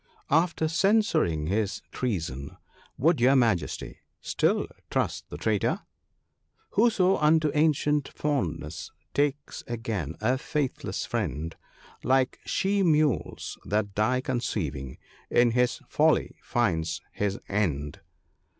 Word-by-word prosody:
After 160 +1 +3
censuring 170 - +2
his 100 +4 -1
treason, 80 - -3 0.4
would 160 -1 +3
your 130 +3 +6
Majesty 110 - 0 0.2
still - - +1 0.2
trust - - -1
the - - -6
traitor? 105 +6 0 0.3
— - - -49
" - - -42
Whoso 200 -4 +3
unto 155 0 +3
ancient 150 -2 +2
fondness 80 - -3 0.2
takes 145 0 -1
again 110 - -3
a 125 +4 +1
faithless 150 -3 -2
friend, 80 - -3 0.5
Like 130 0 +2
she 200 +1 +1
mules 155 -6 +1
that 105 -1 -1
die 120 +5 +1
conceiving, 80 - -3 0.3
in 120 -1 +4
his 125 +1 +1
folly - - +2
finds 80 -9 0
his 100 -1 -1
end." 75 -8 -1
120 Hz, 110 wpm, -27 LUFS, -, 0.5 s, your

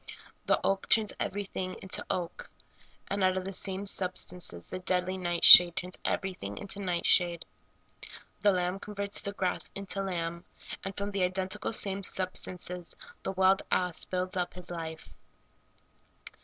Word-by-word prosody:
The - - +3
oak 195 0 -1
turns 215 -2 +3
everything 190 -2 -4
into 190 - -3
oak, 175 -2 -4 0.6
and 200 -1 -2
out 185 0 +2
of 185 - -4
the 195 - -6
same 190 +1 -2
substances 180 - -1
the - - -5
deadly 185 0 0
night 175 -2 0
shade 175 -1 +12
turns 180 +1 -3
everything 100 - -4
into 200 - -4
nightshade. 175 -2 +1 0.9
The 205 - +3
lamb 180 0 -2
converts 200 0 -3
the 200 - -5
grass 185 -2 -2
into 195 0 -5
lamb, 170 -3 -4 0.4
and 195 0 -7
from 200 0 -4
the 200 -1 -3
identical 190 +4 -2
same 200 -3 -1
substances 180 -2 -1 0.3
the - - -4
wild 190 +1 +3
ass 180 -2 +1
builds 185 0 -3
up 180 -1 -3
his 180 -1 -11
life. 160 -2 -7
185 Hz, 145 wpm, -29 LUFS, 180-195 Hz, 0.9 s, shade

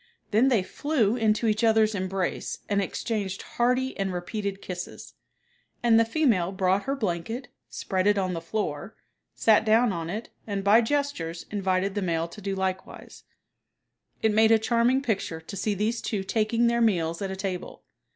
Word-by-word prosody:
Then 225 +5 +4
they 235 -8 +3
flew 240 -2 0
into 220 -1 +1
each 215 +1 +1
other's 220 -1 +4
embrace 190 -2 -2
and 200 -1 +1
exchanged 195 0 -3
hearty 250 +2 0
and 195 -1 0
repeated 195 +2 -4
kisses; 180 -2 -7 0.7
and 230 -1 +5
the 230 - +4
female 225 - +1
brought 190 +1 +1
her 275 +1 -1
blanket, 225 +2 -3 0.2
spread 190 0 -1
it 205 0 +4
on 185 -2 0
the 165 - -4
floor, 170 0 -4 0.4
sat 220 -1 +4
down 220 0 +3
on 165 -1 -4
it 215 +6 -5 0.2
and 200 -2 -2
by 210 +4 +6
gestures 225 - -2
invited 190 -1 0
the 205 - -2
male 165 -2 0
to 210 - -11
do 195 0 -2
likewise. 190 0 -5 1.0
It 220 -1 +3
made 220 +1 +5
a 225 - +6
charming 235 +4 +2
picture 195 -9 -2
to 160 +4 -9
see 205 +2 -1
these 220 +4 -1
two 200 -3 -2
taking 225 +3 +1
their 235 0 +2
meals 170 -6 +1
at 195 - -2
a 190 - -4
table. 190 -2 -5
205 Hz, 170 wpm, -26 LUFS, 185-230 Hz, 1.0 s, by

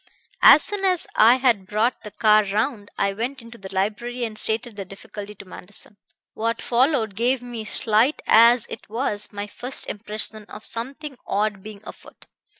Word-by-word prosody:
"As - - +8
soon 410 -1 0
as 370 -3 +1
I 230 +3 +6
had 240 -7 +1
brought 220 +5 0
the 210 - -8
car 215 0 +4
round 210 +1 -2
I 200 0 0
went 245 +6 -4
into 230 0 -13
the 190 -1 -9
library 220 +6 -2
and 220 -2 -7
stated 220 +1 -1
the 200 - -5
difficulty 200 +2 -10
to 200 - -12
Manderson. 200 +2 -12 0.4
"What 230 +1 -2
followed 240 -3 +1
gave 245 +4 0
me, 240 -3 -7
slight 220 +6 +1
as 235 +1 +6
it - - -10
was, 215 -2 -2
my 205 -1 -5
first 250 +5 -4
impression 215 0 -4
of 210 +1 -11
something 270 +4 -5
odd 205 -1 -1
being 210 0 -11
afoot. - - -13
220 Hz, 170 wpm, -23 LUFS, 205-245 Hz, 0.4 s, As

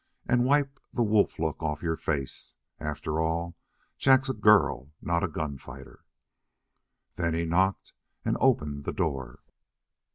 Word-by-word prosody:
And 120 0 +3
wipe 140 0 +2
the 120 - +1
wolf 105 -2 +2
look 80 -1 -2
off 75 -1 -2
your 80 -1 0
face. 70 -4 -3 0.2
After 75 +1 -2
all, 85 +1 -1 0.4
Jack's 135 0 +4
a - - +1
girl, 105 - +3
not 85 0 0
a - - +2
gunfighter." 75 -4 -7 1.1
Then 85 -2 0
he 85 0 0
knocked 95 +4 +1 0.3
and - - +1
opened 75 - +1
the - - -2
door. 65 -3 -3
85 Hz, 135 wpm, -28 LUFS, 75-110 Hz, 1.1 s, Jack's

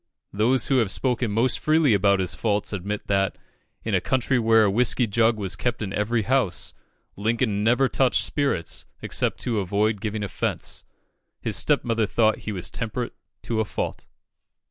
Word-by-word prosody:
Those 115 +5 +2
who 135 - +2
have 115 -5 +1
spoken 125 +2 0
most 115 +5 +1
freely 155 -5 +3
of 100 - +2 0.2
his 90 -3 -2
faults 105 -2 -1
admit 100 +2 -4
that, 95 -1 0 0.5
in - - -3
a - - +3
country 130 0 +1
where 115 -1 +4
a 100 - +3
whiskey 125 +3 +3
jug 115 +1 +2
was 100 -2 -1
kept 120 +2 -2
in 100 -1 -5
every 110 +2 0
house, 125 -7 0 0.4
Lincoln 110 0 0
never 125 +4 +3
touched 130 0 +2
spirits 135 - -1 0.2
except - - 0
to 115 -4 -1
avoid 100 +2 0
giving 110 -1 -3
offence. 100 - -3 0.6
His - - -1
stepmother 115 -2 +1
thought 110 +1 +2
he - - -1
was 95 -4 -2
temperate 120 +1 -4 0.3
to 115 -2 -2
a - - +3
fault. - - -4
110 Hz, 165 wpm, -24 LUFS, 100-120 Hz, 0.6 s, where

